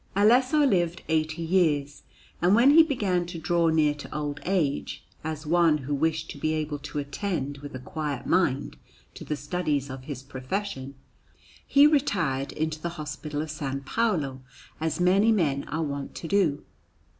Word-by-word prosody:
Alesso 255 +8 +4
lived 175 -5 0
eighty 160 +1 0
years, 155 -5 +1 0.4
and 180 +4 +5
when 245 +5 +6
he 325 +3 +9
began 200 - 0
to 175 -1 -6
draw 170 +1 +1
near 155 -2 +3
to 145 - -10
old 145 -1 -3
age, 175 -7 -1 0.2
as 155 0 -5
one 165 -1 +4
who 145 0 -4
wished 160 +2 0
to 145 - -10
be 155 +2 0
able 150 -1 -3
to 145 - -7
attend 145 -1 -3
with 145 -1 -9
a - - -5
quiet 145 0 -4
mind 145 -6 +1 0.4
to - - -9
the 150 - -2
studies 145 -2 -2
of 130 -1 -8
his 135 -3 -6
profession, 135 +1 -5 0.7
he 280 +1 +6
retired 180 - +1
into 155 0 -3
the 170 +1 -4
Hospital 150 0 -4
of 155 -1 -6
S. 135 -2 -2
Paolo, 155 - 0 0.4
as 160 +1 -2
many 195 +5 +4
men 150 -10 +1
are 160 +2 -2
wont 140 -2 -5
to 165 - -6
do. 170 -7 +1
155 Hz, 170 wpm, -26 LUFS, 145-180 Hz, 0.7 s, he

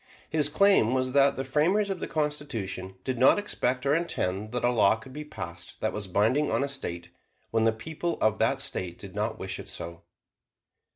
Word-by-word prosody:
His 150 -2 +3
claim 155 - +4
was 130 0 0
that 140 0 +4
the 135 - -2
framers 175 +10 +2
of 190 - -3
the - - -3
Constitution 130 -12 -3
did 130 -2 -2
not 130 - +6
expect 130 -11 -1
or 140 - +3
intend 110 - -1
that 125 - -2
a 120 - +4
law 110 -3 +5
could 110 +4 -12
be 150 +2 -5
passed 85 - -8
that 110 - -1
was 105 -2 -4
binding 110 +11 +2
on - - +1
a - - 0
State 90 -11 -5 0.4
when 115 0 +2
the 115 - +5
people 160 +9 -4
of 110 -1 +2
that - - +2
State 90 -1 -3
did 100 -2 -10
not 110 +2 -2
wish 95 -1 -4
it - - -8
so. 85 0 -6
125 Hz, 205 wpm, -28 LUFS, 100-150 Hz, 0.4 s, not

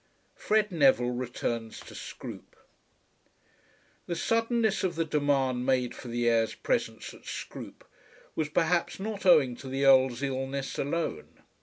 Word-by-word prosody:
FRED 210 -1 +1
NEVILLE 135 -6 +4
RETURNS 120 -2 -3
TO - - -12
SCROOPE. - - -9 1.5
The 170 - -2
suddenness 230 +2 +1
of 180 -3 0
the 165 0 0
demand 140 -4 +1
made 125 -2 +1
for - - -10
the 120 0 -1
heir's 115 -1 +2
presence - - -2
at - - -16
Scroope - - -7 0.5
was 155 -2 -1
perhaps 170 +4 +1
not 205 -1 -3
owing 145 -8 +6
to 135 - -9
the 135 +1 0
Earl's 130 -1 +5
illness 135 0 -3
alone. 165 +4 -3
135 Hz, 135 wpm, -29 LUFS, 125-170 Hz, 1.5 s, owing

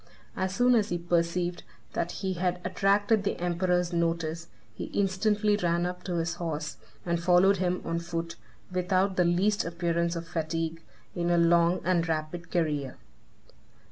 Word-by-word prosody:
As 190 0 -2
soon 250 +2 +4
as 215 -3 +3
he 175 - 0
perceived 175 +1 0 0.3
that 170 - -1
he 190 -1 0
had 180 0 -1
attracted 200 +3 +2
the 200 - -2
emperor's 180 0 0
notice, 165 -1 -1 0.3
he - - -5
instantly 205 +2 +1
ran 175 -2 +1
up 180 0 -4
to 180 - -2
his 165 0 -1
horse, 150 -3 -3 0.3
and 170 -1 0
followed 180 +3 +5
him 180 0 -1
on 165 0 -1
foot, 170 0 -4 0.4
without 185 +1 +1
the 180 - +3
least 195 +4 +2
appearance 170 0 -1
of 170 0 -5
fatigue, 165 0 -3 0.3
in 175 0 -1
a 175 - +3
long 170 +1 +4
and 170 -2 +1
rapid 160 +2 -3
career. 150 -6 -1
175 Hz, 155 wpm, -28 LUFS, 170-185 Hz, 0.4 s, followed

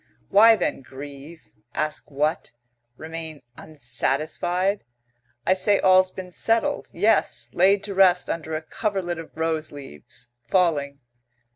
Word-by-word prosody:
Why 225 +3 +7
then 205 - -2
grieve? 140 0 -11 0.2
Ask 155 -1 -3
what? 150 +1 -2 0.4
Remain 160 -2 -7
unsatisfied? 155 - -1 0.6
I 185 - +4
say 195 +2 +2
all's 185 0 +5
been 185 -1 -9
settled; 230 +9 0
yes; 220 +2 +1
laid 195 +3 +3
to 200 - -4
rest 185 -2 +4
under 160 -1 -4
a 155 - -4
coverlet 190 -2 -3
of 165 - -9
rose 160 -1 -2
leaves, 125 - -12 0.2
falling. 145 -4 +1
165 Hz, 120 wpm, -24 LUFS, 150-190 Hz, 0.6 s, Why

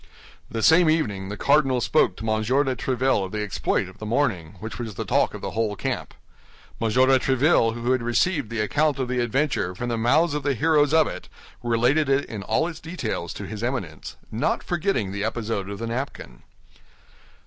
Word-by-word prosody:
The 115 -1 -3
same 160 +1 +6
evening 105 -12 0
the 105 - -5
cardinal 140 -1 +3
spoke 120 -7 +2
to - - -8
M. 110 0 +1
de 130 +4 +1
Tréville 130 -2 +1
of 95 - -6
the 105 -1 -2
exploit 100 -2 -1
of 95 - -14
the 110 - -6
morning, 105 - 0
which 110 +5 -7
was 115 -4 -5
the - - -4
talk - - +1
of - - -8
the - - -4
whole 110 +1 -1
camp. - - -4 0.7
M. 115 - +1
de 130 +3 +4
Tréville, 130 -3 +3
who 120 +1 -1
had 130 -1 +2
received 120 - +1
the 115 -2 -2
account 150 +8 +1
of 130 -2 -2
the 125 0 -1
adventure 120 -6 0
from 120 +6 -4
the 115 -1 -1
mouths 150 +8 +3
of 150 - -1
the 140 -1 0
heroes 150 +3 +3
of 160 0 +5
it, - - -7 0.3
related 120 +5 +2
it 135 +1 +2
in 110 -3 -6
all 110 +11 0
its 165 -2 -7
details 125 - -4
to 100 - -6
his 105 +2 -7
Eminence, 115 - -4 0.2
not 115 +7 -1
forgetting 170 - -1
the 100 +1 -3
episode 110 -3 -2
of 100 - -5
the 115 - -4
napkin. 115 - -5
120 Hz, 205 wpm, -24 LUFS, 105-145 Hz, 0.7 s, same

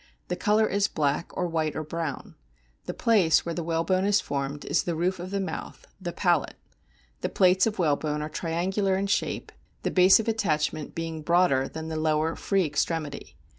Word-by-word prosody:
The - - 0
colour 215 0 +2
is 200 -1 +1
black 150 +1 -1
or 180 - 0
white 160 -3 -1
or 155 - -3
brown. 155 -2 -5 0.5
The - - -4
place 195 -9 +3
where 170 - -2
the 170 - -3
whalebone 170 +3 0
is 205 0 +4
formed 140 -1 -4
is - - +2
the 170 - -3
roof 180 +3 0
of 180 +1 -6
the 200 +1 -2
mouth, 190 - -6 0.2
the 175 -2 -3
palate. 175 -5 +1 0.6
The - - -2
plates 185 +1 +4
of 220 - -3
whalebone 150 -3 0
are - - -3
triangular 190 +4 -1
in 195 - -1
shape, 200 - -1 0.3
the - - 0
base 185 +2 +6
of 225 - -3
attachment 155 -9 -1
being 165 -1 -4
broader 155 -5 +3
than 160 0 -7
the 160 - -3
lower, 155 +1 +1
free 195 -3 +1
extremity. 150 -1 -3
170 Hz, 185 wpm, -26 LUFS, 155-190 Hz, 0.6 s, base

